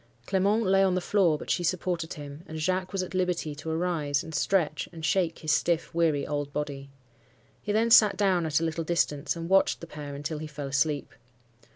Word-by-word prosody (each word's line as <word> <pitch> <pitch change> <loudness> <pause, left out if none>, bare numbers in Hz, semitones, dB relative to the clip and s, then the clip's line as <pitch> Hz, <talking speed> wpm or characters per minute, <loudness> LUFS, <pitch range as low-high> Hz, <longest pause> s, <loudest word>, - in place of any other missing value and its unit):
Clement 200 +4 +2
lay 195 +1 +4
on 190 -1 +2
the - - +2
floor, 180 -4 +2
but - - -5
she 175 - 0
supported 175 -1 -1
him, 145 +1 -9
and 160 - -7
Jacques 185 +3 -1
was 195 -2 -1
at 185 - -8
liberty 180 -4 -1
to 155 +2 -7
arise 160 -4 0
and 160 - -9
stretch 155 -1 0
and 165 -2 -6
shake 170 +1 +1
his 155 -2 -2
stiff, 165 +1 +1
weary 160 -4 +1
old 145 -1 -3
body. 140 -2 -4 0.7
He 210 - -3
then 225 +2 +2
sat 215 -3 +7
down 185 -5 +2
at 150 -1 +2
a - - -3
little 165 0 -2
distance, 155 -3 0
and 165 0 -5
watched 195 +1 +3
the - - -8
pair 150 -3 -8
until 150 +2 -4
he 155 - -6
fell 145 -2 -6
asleep. 145 0 0
165 Hz, 210 wpm, -27 LUFS, 150-185 Hz, 0.7 s, sat